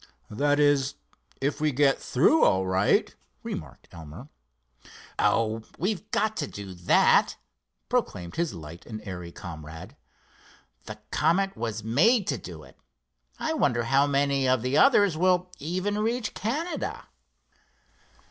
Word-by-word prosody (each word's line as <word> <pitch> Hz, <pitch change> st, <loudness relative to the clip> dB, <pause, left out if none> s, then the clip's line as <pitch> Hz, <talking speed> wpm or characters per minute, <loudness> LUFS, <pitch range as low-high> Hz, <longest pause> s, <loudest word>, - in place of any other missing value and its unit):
"That 145 Hz, +6 st, +1 dB
is, 145 Hz, -2 st, +2 dB, 0.5 s
if 145 Hz, +2 st, -1 dB
we 155 Hz, -1 st, +2 dB
get 135 Hz, 0 st, +2 dB
through 175 Hz, -, +3 dB
all 95 Hz, 0 st, +3 dB
right," 95 Hz, +2 st, +2 dB, 0.3 s
remarked 65 Hz, -4 st, -7 dB
Elmer. 80 Hz, -3 st, -11 dB, 0.9 s
"Oh, 115 Hz, 0 st, +1 dB, 0.2 s
we've 210 Hz, +3 st, -2 dB
got 215 Hz, 0 st, 0 dB
to 145 Hz, -, -2 dB
do 100 Hz, -2 st, -8 dB
that," 85 Hz, 0 st, +3 dB, 0.5 s
proclaimed 85 Hz, -1 st, -2 dB
his 170 Hz, -, -1 dB
light 80 Hz, +1 st, -10 dB
and 110 Hz, -2 st, -6 dB
airy 90 Hz, -2 st, -6 dB
comrade. 80 Hz, -2 st, -9 dB, 0.9 s
"The -, -, -8 dB
Comet 195 Hz, +3 st, +1 dB
was 115 Hz, -2 st, -4 dB
made 185 Hz, -, +3 dB
to 135 Hz, -6 st, -1 dB
do 85 Hz, -4 st, -10 dB
it. -, -, -18 dB, 0.6 s
I -, -, -2 dB
wonder 120 Hz, -1 st, +1 dB
how 135 Hz, +4 st, +3 dB
many 140 Hz, -1 st, +1 dB
of 130 Hz, -3 st, +2 dB
the 130 Hz, +2 st, -1 dB
others 205 Hz, -, +5 dB
will 180 Hz, +1 st, +2 dB
even 185 Hz, +7 st, -2 dB
reach 225 Hz, +1 st, -1 dB
Canada?" 300 Hz, -, -3 dB
140 Hz, 130 wpm, -26 LUFS, -, 0.9 s, others